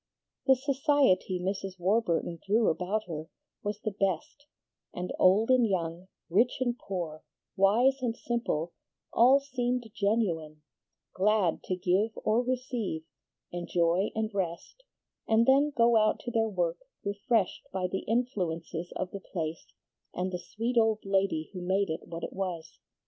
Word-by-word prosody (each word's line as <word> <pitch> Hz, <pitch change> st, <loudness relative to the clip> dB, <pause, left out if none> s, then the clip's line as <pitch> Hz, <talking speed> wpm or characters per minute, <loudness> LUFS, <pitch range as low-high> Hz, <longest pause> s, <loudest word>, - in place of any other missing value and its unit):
The 265 Hz, -, +7 dB
society 270 Hz, -, +2 dB
Mrs. 190 Hz, 0 st, -3 dB
Warburton 175 Hz, -3 st, +1 dB
drew 215 Hz, +3 st, +3 dB
about 185 Hz, +6 st, -1 dB
her 160 Hz, -2 st, -6 dB, 0.3 s
was 210 Hz, 0 st, -3 dB
the 215 Hz, -, -2 dB
best, 195 Hz, -, -2 dB, 0.5 s
and 180 Hz, +1 st, -4 dB
old 205 Hz, +6 st, +5 dB
and 250 Hz, -3 st, +5 dB
young, 175 Hz, -2 st, -2 dB, 0.2 s
rich 220 Hz, +9 st, +2 dB
and 245 Hz, -2 st, 0 dB
poor, 175 Hz, -9 st, -5 dB, 0.3 s
wise 225 Hz, +8 st, +4 dB
and 235 Hz, -2 st, -1 dB
simple, 200 Hz, -9 st, -2 dB, 0.4 s
all 255 Hz, +4 st, +6 dB
seemed 250 Hz, -3 st, -1 dB
genuine, 170 Hz, -8 st, -1 dB, 0.5 s
glad 195 Hz, -3 st, +2 dB
to 185 Hz, -, -1 dB
give 190 Hz, +4 st, +1 dB
or 220 Hz, +3 st, +3 dB
receive, 245 Hz, -9 st, -2 dB, 0.5 s
enjoy 175 Hz, +2 st, +1 dB
and 220 Hz, 0 st, -1 dB
rest, 185 Hz, -, -4 dB, 0.5 s
and 225 Hz, +1 st, +4 dB
then 275 Hz, +3 st, +5 dB
go 235 Hz, 0 st, +5 dB
out 215 Hz, 0 st, +3 dB
to 240 Hz, -, -5 dB
their 225 Hz, -1 st, +1 dB
work 175 Hz, -4 st, -1 dB, 0.3 s
refreshed 200 Hz, 0 st, 0 dB
by 190 Hz, -1 st, -1 dB
the 190 Hz, +1 st, -1 dB
influences 180 Hz, -8 st, -2 dB
of 185 Hz, 0 st, -3 dB
the 200 Hz, -, -5 dB
place 160 Hz, -2 st, -4 dB, 0.5 s
and 185 Hz, +1 st, -1 dB
the 180 Hz, -, -3 dB
sweet 230 Hz, +6 st, -1 dB
old 220 Hz, -2 st, +1 dB
lady 195 Hz, -5 st, 0 dB
who 180 Hz, -, -6 dB
made 190 Hz, 0 st, +1 dB
it 160 Hz, -, -5 dB
what 165 Hz, 0 st, -7 dB
it -, -, -4 dB
was. 180 Hz, -4 st, -5 dB
195 Hz, 145 wpm, -29 LUFS, 175-235 Hz, 0.5 s, The